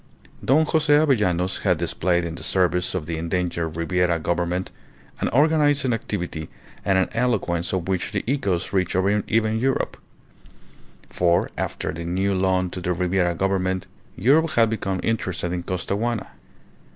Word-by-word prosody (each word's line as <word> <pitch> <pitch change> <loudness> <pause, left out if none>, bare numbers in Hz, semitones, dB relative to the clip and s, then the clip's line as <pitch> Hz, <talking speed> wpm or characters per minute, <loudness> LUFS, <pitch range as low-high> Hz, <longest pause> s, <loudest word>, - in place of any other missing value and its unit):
Don 155 +5 +4
Jose 155 -1 +1
Avellanos 105 - +3
had - - +2
displayed 85 -1 0
in 85 - -4
the - - -8
service 90 -1 +1
of 85 -4 -2
the 80 0 -3
endangered 85 -1 -2
Ribiera 85 +1 +1
Government 85 +2 -1 0.5
an - - 0
organizing 145 -2 +3
activity 90 -8 -4 0.3
and 95 -1 +2
an 95 - +2
eloquence 90 -8 0
of 95 -2 -2
which 95 -2 -1
the - - -2
echoes 100 -11 -1
reached 95 -2 +1 0.3
even 110 0 +1
Europe. 135 +2 0 1.1
For, 85 -1 +2
after - - -3
the 85 +2 -6
new 95 +4 0
loan 95 -1 +1
to 90 - -6
the 90 0 0
Ribiera 90 0 +1
Government, 95 0 0 0.3
Europe 150 - +3
had 115 -1 +4
become 95 -4 -2
interested 90 -6 -1
in 90 - -2
Costaguana. 100 +6 -2
95 Hz, 145 wpm, -23 LUFS, 85-115 Hz, 1.1 s, Don